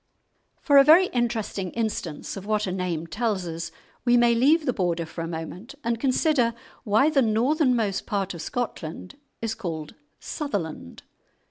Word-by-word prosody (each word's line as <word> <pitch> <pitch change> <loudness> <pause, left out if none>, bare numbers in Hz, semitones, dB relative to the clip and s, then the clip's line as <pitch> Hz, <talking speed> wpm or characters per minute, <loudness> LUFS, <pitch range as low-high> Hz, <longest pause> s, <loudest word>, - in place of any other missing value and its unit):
For 285 -2 +6
a - - +8
very 335 +6 +7
interesting 230 -6 -1
instance 215 -9 -3
of 195 0 -8
what 215 0 +1
a 185 - -2
name 180 -3 -2
tells 205 +2 -1
us 165 0 -4 0.3
we 245 -1 +4
may 240 0 +5
leave 290 +7 +4
the 255 - +1
Border 175 -4 -1
for 165 - -7
a - - -4
moment 170 - -7
and 235 -1 -1
consider 255 -3 +2 0.3
why 220 +8 +3
the 280 -3 +4
northernmost 235 - +1
part 195 -3 -1
of 170 - -7
Scotland 185 - -5 0.3
is 225 -1 -1
called 165 -9 -5 0.3
"Sutherland." 175 - -5
220 Hz, 155 wpm, -25 LUFS, 180-245 Hz, 0.3 s, a